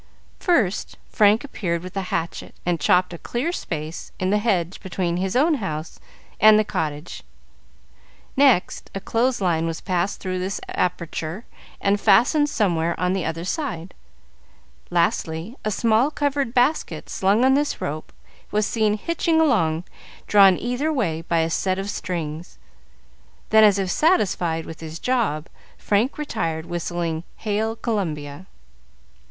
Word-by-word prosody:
First, 235 - +1
Frank 210 +1 +4
appeared 175 -11 -3
with 185 +1 -9
a 195 - 0
hatchet 165 0 -3
and 175 -1 0
chopped 180 +4 +3
a 170 - -8
clear 260 +8 -2
space 160 - -5
in 185 +1 0
the 210 - +3
hedge 190 -5 0
between 180 -3 -2
his 190 +3 -2
own 305 +6 +4
house 155 -4 -5 0.4
and 215 +1 +8
the 215 - +4
cottage; 155 -4 -4 1.1
next, 265 -9 +3
a - - -2
clothes 235 +4 0
line 165 -3 +1
was 165 -1 -3
passed 180 +1 -1
through 185 -1 -3
this 190 +2 -3
aperture 175 +2 -3 0.3
and 200 0 +1
fastened 275 +8 +4
somewhere 170 - 0
on 180 +1 +1
the 190 -2 -1
other 165 +1 -3
side; 190 - -3 1.0
lastly, 170 +3 0
a 215 - 0
small 225 +5 +2
covered 285 -4 -1
basket, 255 +6 +1
slung 200 +6 +2
on 265 - +5
this 290 +1 0
rope, 155 +2 -4 0.4
was 210 0 +1
seen 215 -1 +1
hitching 335 - 0
along, 175 - +2 0.4
drawn 195 -3 +6
either 250 +6 -1
way 180 - -1
by 165 0 +1
a 160 - 0
set 185 +2 0
of 195 +1 -3
strings; 165 -2 -5 0.9
then, 220 0 +7
as 205 -2 +6
if 190 -2 -1
satisfied 180 - +1
with 160 - -9
his 160 0 -7
job, 210 -10 0 0.3
Frank 215 +6 0
retired, 165 - -3
whistling 170 -1 -3
"Hail 220 +1 -1
Columbia." 175 - -3
190 Hz, 145 wpm, -23 LUFS, 170-230 Hz, 1.1 s, and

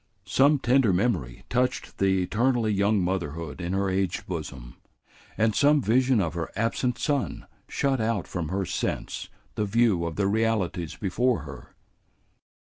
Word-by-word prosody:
Some 140 +10 +4
tender 125 -4 +3
memory 90 - -1
touched 125 +1 -1
the 95 -1 +2
eternally 115 +2 +1
young 100 +1 +2
motherhood 85 -3 -3
in 85 +2 -3
her 100 0 +1
aged 95 -1 -1
bosom, 70 -8 -6 0.6
and 110 0 +2
some 145 +5 +4
vision 130 0 +3
of 85 -5 0
her 85 -1 -3
absent 115 +3 0
son 140 +4 -1 0.2
shut 135 -3 0
out 110 -3 -1
from 85 -4 -3
her 95 +1 -1
sense 85 - -3 0.2
the 105 - -1
view 105 -4 +2
of 80 - -5
the 100 - 0
realities 100 -6 0
before 115 +5 0
her. - - -11
100 Hz, 145 wpm, -26 LUFS, 90-120 Hz, 0.6 s, Some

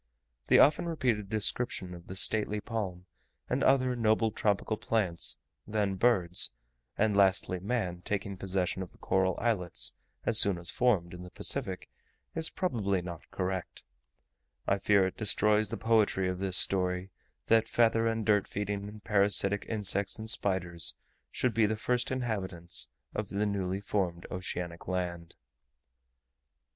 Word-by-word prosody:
The - - +5
often 155 +4 +5
repeated 125 - -1
description 105 -3 0
of 85 -1 -12
the 95 - -7
stately 105 +1 +1
palm 100 -6 -5 0.4
and - - -1
other 130 -2 +3
noble 110 -1 +2
tropical 105 0 0
plants, 100 -6 -1 0.3
then 105 -2 0
birds, 95 -4 +4 0.5
and 105 -1 +2
lastly 95 -2 +3
man, 95 -4 -2
taking 100 0 -3
possession 95 0 -2
of 90 - -7
the - - -21
coral 95 -1 0
islets 100 -7 -1 0.3
as 115 -2 +4
soon 100 -3 +4
as 85 0 -3
formed, 100 -9 +1
in 90 - -9
the 90 - -9
Pacific, - - -1 0.5
is 165 -1 -1
probably 100 - -1
not 85 -2 -9
correct; 95 -2 -4 0.8
I 100 - +1
fear 100 -1 +3
it 95 - -4
destroys 105 0 +3
the - - -4
poetry 110 -4 +2
of 90 0 -3
this 95 -1 +2
story, 90 0 +2 0.3
that 115 0 +3
feather 115 -1 +2
and 115 -1 -1
dirt 105 -3 +3
feeding 100 0 -4
and 105 -1 -12
parasitic 100 -1 +2
insects 100 -2 0
and 110 - -7
spiders 95 -6 0 0.3
should 125 -2 -1
be 110 -1 +3
the 110 +1 -2
first 125 +2 0
inhabitants 95 - -2 0.2
of 105 -2 -4
newly 100 -2 -1
formed 90 -4 -2
oceanic 90 -2 -5
land. 85 -2 -4
100 Hz, 145 wpm, -30 LUFS, 90-110 Hz, 0.8 s, The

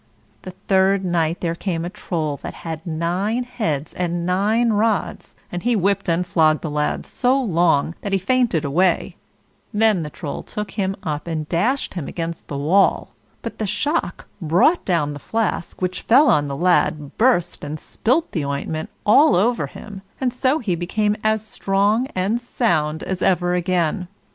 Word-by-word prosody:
The 185 -1 -9
third 190 0 +3
night 170 -1 0
there 165 -2 0
came 170 -1 -3
a - - -3
Troll 160 -8 -3
that - - -8
had 160 -1 -5
nine 180 +9 -1
heads 170 - -3
and 175 -1 -2
nine 215 +6 +2
rods, 215 -1 -1 0.2
and 175 - -4
he 240 +3 +1
whipped 200 -1 +1
and 170 +2 +1
flogged 155 -3 +3
the 155 - -3
lad 150 0 -1
so 260 +2 +1
long 170 - +2
that 200 - -4
he 195 - +3
fainted 210 - +1
away; 170 +5 +1 0.6
then 215 -4 +3
the 150 - -4
Troll 145 0 -6
took 210 -1 -6
him 195 -2 -1
up 150 -2 -3
and 155 -2 -3
dashed 235 - 0
him 170 -6 -5
against 165 -1 -5
the 140 - -4
wall; 175 +8 +2 0.3
but - - -6
the 215 - -1
shock 295 - -2
brought 180 - +3
down 160 -6 +1
the 145 - -8
flask, 220 -2 -2
which 185 0 -2
fell 275 +6 +5
on 145 -1 +2
the 140 -1 -4
lad, 155 -4 +1
burst, 230 -8 +2
and 150 +1 -5
spilled 260 - 0
the 160 - -2
ointment 140 +3 -3 0.2
all 285 +9 +6
over 230 +7 +2
him, 200 -2 -10 0.2
and 255 -2 0
so 260 +3 +1
he 215 - -2
became 205 +5 0
as 215 0 +1
strong 205 +4 +1
and 200 +6 0
sound 160 -11 0
as 190 -1 -3
ever 175 -1 +2
again. 180 0 0
185 Hz, 175 wpm, -21 LUFS, 165-215 Hz, 0.6 s, all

